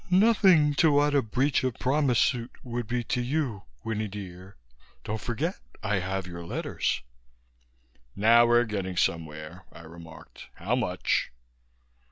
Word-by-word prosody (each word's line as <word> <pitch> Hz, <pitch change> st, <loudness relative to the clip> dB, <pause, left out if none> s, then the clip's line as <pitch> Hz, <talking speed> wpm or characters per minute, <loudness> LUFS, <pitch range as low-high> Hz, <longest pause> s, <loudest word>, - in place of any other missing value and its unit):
"Nothing 185 Hz, -6 st, +5 dB
to 160 Hz, -3 st, +5 dB
what 145 Hz, 0 st, +3 dB
a 140 Hz, -, +4 dB
breach 130 Hz, +6 st, 0 dB
of 130 Hz, -3 st, -1 dB
promise 135 Hz, -2 st, +1 dB
suit 120 Hz, +1 st, +1 dB
would 120 Hz, -2 st, -4 dB
be 120 Hz, +1 st, -1 dB
to 125 Hz, -, -1 dB
you, 125 Hz, -5 st, -2 dB, 0.2 s
Winnie 110 Hz, -1 st, -2 dB
dear. 95 Hz, -2 st, -9 dB, 0.5 s
Don't 110 Hz, 0 st, -4 dB
forget 150 Hz, -, -3 dB, 0.2 s
I 105 Hz, -2 st, 0 dB
have 95 Hz, +1 st, -3 dB
your 85 Hz, -1 st, -8 dB
letters." 75 Hz, -6 st, -2 dB, 1.1 s
"Now 115 Hz, +3 st, +5 dB
we're 120 Hz, 0 st, +5 dB
getting 95 Hz, -4 st, -4 dB
somewhere," 80 Hz, 0 st, -2 dB
I -, -, -13 dB
remarked. 80 Hz, -1 st, -13 dB
"How 105 Hz, +8 st, -1 dB
much?" 95 Hz, -7 st, -1 dB
115 Hz, 140 wpm, -27 LUFS, 90-130 Hz, 1.1 s, Nothing